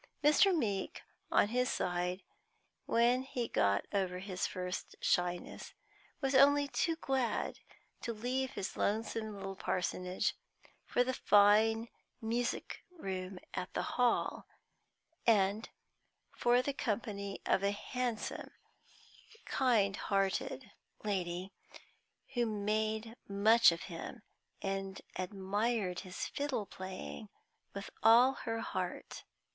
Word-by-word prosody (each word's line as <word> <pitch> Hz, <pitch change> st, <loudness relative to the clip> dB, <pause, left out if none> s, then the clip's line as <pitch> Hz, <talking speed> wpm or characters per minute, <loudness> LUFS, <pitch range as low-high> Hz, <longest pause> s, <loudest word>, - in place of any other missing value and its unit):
Mr. 300 Hz, +7 st, +6 dB
Meeke, 215 Hz, -, -1 dB, 0.3 s
on 205 Hz, -, +4 dB
his 250 Hz, +2 st, +1 dB
side, 180 Hz, +1 st, -1 dB, 0.6 s
when 240 Hz, +2 st, +4 dB
he 250 Hz, -3 st, -3 dB
got 100 Hz, -, +2 dB
over 190 Hz, -2 st, 0 dB
his 185 Hz, -1 st, -2 dB
first 180 Hz, 0 st, -5 dB
shyness, 175 Hz, 0 st, -1 dB, 0.5 s
was 270 Hz, -1 st, 0 dB
only 285 Hz, +2 st, +6 dB
too 330 Hz, +3 st, 0 dB
glad 265 Hz, -6 st, -1 dB, 0.4 s
to 235 Hz, -, -2 dB
leave 250 Hz, +4 st, -1 dB
his 190 Hz, -, -4 dB
lonesome 220 Hz, 0 st, -1 dB
little 195 Hz, 0 st, -5 dB
parsonage 180 Hz, 0 st, -1 dB, 0.5 s
for 245 Hz, -, +3 dB
the 260 Hz, +1 st, -1 dB
fine 220 Hz, +2 st, +5 dB, 0.3 s
music 235 Hz, +1 st, -2 dB
room 190 Hz, -, -5 dB, 0.2 s
at 180 Hz, -, -3 dB
the -, -, 0 dB
Hall, 245 Hz, -2 st, +1 dB, 0.8 s
and 210 Hz, 0 st, +3 dB, 0.7 s
for 245 Hz, +1 st, +3 dB
the 280 Hz, -, -1 dB
company 200 Hz, -5 st, -3 dB
of -, -, +3 dB
a 200 Hz, -, +2 dB
handsome, 235 Hz, +2 st, -3 dB, 1.0 s
kind 220 Hz, -7 st, +2 dB
hearted 200 Hz, +4 st, -1 dB, 0.3 s
lady, 185 Hz, -2 st, -2 dB, 0.8 s
who 240 Hz, -2 st, +1 dB
made 215 Hz, +1 st, -1 dB
much 215 Hz, +2 st, +6 dB
of 170 Hz, -, -4 dB
him, 185 Hz, +6 st, -7 dB, 0.4 s
and 195 Hz, -1 st, -3 dB
admired 195 Hz, +1 st, -1 dB
his 185 Hz, -2 st, -5 dB
fiddle 280 Hz, -7 st, -2 dB
playing 190 Hz, +3 st, -7 dB, 0.5 s
with 200 Hz, 0 st, -6 dB
all 235 Hz, +4 st, +7 dB
her 225 Hz, -3 st, -3 dB
heart. -, -, -4 dB
215 Hz, 110 wpm, -34 LUFS, 190-245 Hz, 1.0 s, all